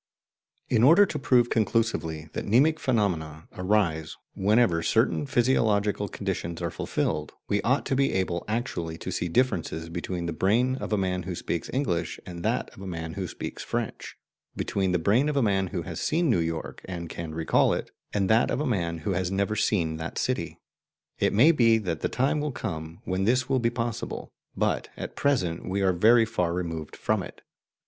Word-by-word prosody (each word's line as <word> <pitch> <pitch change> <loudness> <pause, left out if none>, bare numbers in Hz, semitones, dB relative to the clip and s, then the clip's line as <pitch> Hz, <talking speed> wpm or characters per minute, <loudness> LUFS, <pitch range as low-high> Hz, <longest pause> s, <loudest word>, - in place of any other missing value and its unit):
In 115 - +2
order 165 - +7
to - - -4
prove 120 -3 +3
conclusively 105 -8 0
that - - -4
mnemic 145 +9 +4
phenomena 85 - -1
arise 90 -5 0 0.2
whenever 100 -3 +3
certain 115 - +1
physiological 110 -6 +2
conditions 90 -5 -4
are 85 -1 -2
fulfilled, - - -2
we 100 - +1
ought 130 +4 +1
to 135 - 0
be 135 +1 +2
able 90 -2 -1
actually 105 -8 -3
to 95 - -5
see 90 0 -1
differences 85 -6 0
between 85 +1 -4
the 85 - -2
brain 115 +10 +2
of - - -5
a 105 - +2
man 90 -1 0
who 90 0 -5
speaks 85 0 -3
English 90 - -1
and 85 -1 -7
that - - -1
of - - -14
a 95 - -6
man 80 -2 -5
who 95 -2 -3
speaks - - -6
French, - - -4 0.4
between 95 -2 -1
the 90 - +3
brain 110 - +2
of 145 - -1
a 135 - +3
man 95 -3 +2
who - - -4
has - - -6
seen 165 -2 +2
New 95 - +3
York 80 -1 -3
and 85 -2 -5
can 80 -1 -6
recall 80 0 +3
it, - - -3 0.2
and 100 -2 +1
that 110 +4 +4
of - - 0
a 150 - 0
man 85 - -1
who 100 - +1
has 90 -1 0
never 100 +2 0
seen 85 -7 +1
that 80 +1 -6
city. - - -2 0.6
It - - +2
may 130 +11 +6
be 115 -7 +4
that 90 -7 -3
the - - -1
time 135 +4 +1
will 150 0 -1
come 80 -8 -5
when 95 +1 -1
this 125 +3 +2
will 135 -1 +2
be 115 -1 +2
possible, 115 -1 -4 0.3
but - - 0
at - - -6
present 95 -15 0
we 100 +2 0
are 95 -1 +3
very 115 +6 +5
far 90 -6 -1
removed 80 -4 -4
from - - 0
it. - - -10
95 Hz, 195 wpm, -27 LUFS, 85-120 Hz, 0.6 s, order